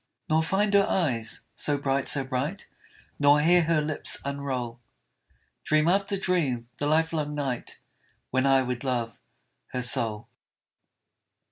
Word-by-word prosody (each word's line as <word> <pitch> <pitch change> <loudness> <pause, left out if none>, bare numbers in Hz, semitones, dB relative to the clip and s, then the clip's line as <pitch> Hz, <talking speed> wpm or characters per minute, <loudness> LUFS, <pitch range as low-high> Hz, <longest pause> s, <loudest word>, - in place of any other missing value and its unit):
Nor 160 +1 +2
find 200 +5 0
her 200 -1 +4
eyes 120 -11 0
so 145 -1 +1
bright, 140 -1 -1
so 135 - +5
bright, 135 +9 -4 0.5
Nor 145 0 +5
hear 175 +4 +4
her 165 -1 +2
lips 150 0 0
unroll 130 -4 -4 0.8
Dream 155 +1 +2
after 195 +2 +1
dream 150 -11 -1
the 145 - -2
lifelong 155 -1 0
night, 135 -4 -4 0.5
When 130 +1 +1
I 135 -1 +4
would 125 0 -4
love 120 -4 -3 0.5
her 125 - -1
soul. 115 -4 0
145 Hz, 130 wpm, -26 LUFS, 125-160 Hz, 0.8 s, so